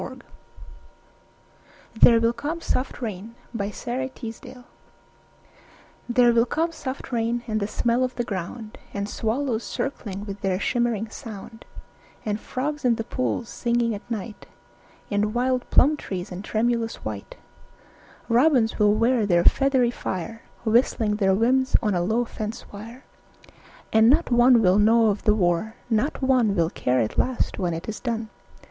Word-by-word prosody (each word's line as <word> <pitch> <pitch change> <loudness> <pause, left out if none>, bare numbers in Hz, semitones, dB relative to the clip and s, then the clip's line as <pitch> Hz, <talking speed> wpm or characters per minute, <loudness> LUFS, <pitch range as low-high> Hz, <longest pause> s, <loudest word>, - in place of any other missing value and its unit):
VIII - - -7 1.7
"There 230 +1 +6
Will 230 +1 +2
Come 295 +8 -4
Soft 255 -5 -2
Rains" 215 +1 -6 0.2
(War 200 -3 -2
Time) 250 +1 -6 1.5
There 240 0 +4
will 235 +1 +3
come 330 +5 0
soft 270 -5 -6
rains 235 0 -1
and 215 -2 -1
the 200 - -1
smell 235 +3 +1
of 255 0 -2
the 240 - -1
ground, 215 +2 -6 0.2
And 200 0 -2
swallows 230 +2 -1
circling 205 -7 -4
with 200 -1 -7
their 190 -1 0
shimmering 230 -1 0
sound; 225 -1 -9 0.6
And 210 0 -1
frogs 290 +6 -4
in 245 -2 +3
the 225 - -3
pools 245 0 -2
singing 235 -1 0
at 205 +3 -9
night, 220 -1 -6 0.6
And 210 +2 0
wild 250 0 0
plum 295 +4 +5
trees 190 -7 -6
in 180 +1 -6
tremulous 230 +2 0
white; 105 -2 -6 0.9
Robins 240 -2 +3
will 210 0 +4
wear 230 -1 +2
their 175 -3 +3
feathery 265 -1 +3
fire 225 +1 -5 0.2
Whistling 220 -2 +2
their 190 -2 +3
whims 260 +5 +2
on 210 -2 +1
a 175 - +1
low 220 +7 +1
fence 215 -1 -6
wire; 230 +6 -10 0.9
And 220 +1 +6
not 295 +1 +3
one 240 -1 +6
will 185 +2 +4
know 225 +1 +5
of 200 - -5
the 210 - +4
war, 180 +3 0 0.2
not 235 +6 0
one 250 -6 +3
Will 170 -2 +1
care 125 -7 0
at 110 - -2
last 255 -3 0
when 175 -3 -1
it 165 - -7
is 220 - -5
done. 230 -3 -3
230 Hz, 155 wpm, -24 LUFS, 210-245 Hz, 1.7 s, There